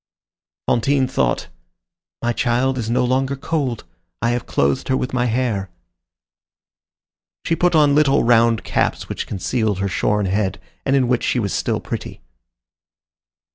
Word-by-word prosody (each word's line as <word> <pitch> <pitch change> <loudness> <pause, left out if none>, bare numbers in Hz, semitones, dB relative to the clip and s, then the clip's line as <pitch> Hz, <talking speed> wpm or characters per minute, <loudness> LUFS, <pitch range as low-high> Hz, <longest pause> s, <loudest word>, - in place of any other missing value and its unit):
Fantine 130 +3 +2
thought: 65 - 0 0.8
"My 120 0 +1
child 125 +2 +1
is 115 -2 -3
no 125 +2 +2
longer 130 +2 0
cold. 135 -5 -2 0.4
I 115 +1 +1
have 120 0 -2
clothed 70 -1 0
her 130 - +2
with 125 - -3
my 125 -1 +1
hair." 115 -5 -1 1.8
She 165 - +1
put 175 0 +2
on 150 -2 +5
little 145 -2 +4
round 115 -1 +3
caps - - -1
which - - -4
concealed 105 +1 -1
her 100 +1 -1
shorn 105 +1 0
head, 95 +1 -1 0.3
and 135 - +3
in 130 -2 +3
which 125 0 +1
she - - +1
was 100 -5 -1
still - - -1
pretty. - - -6
120 Hz, 145 wpm, -20 LUFS, 110-130 Hz, 1.8 s, on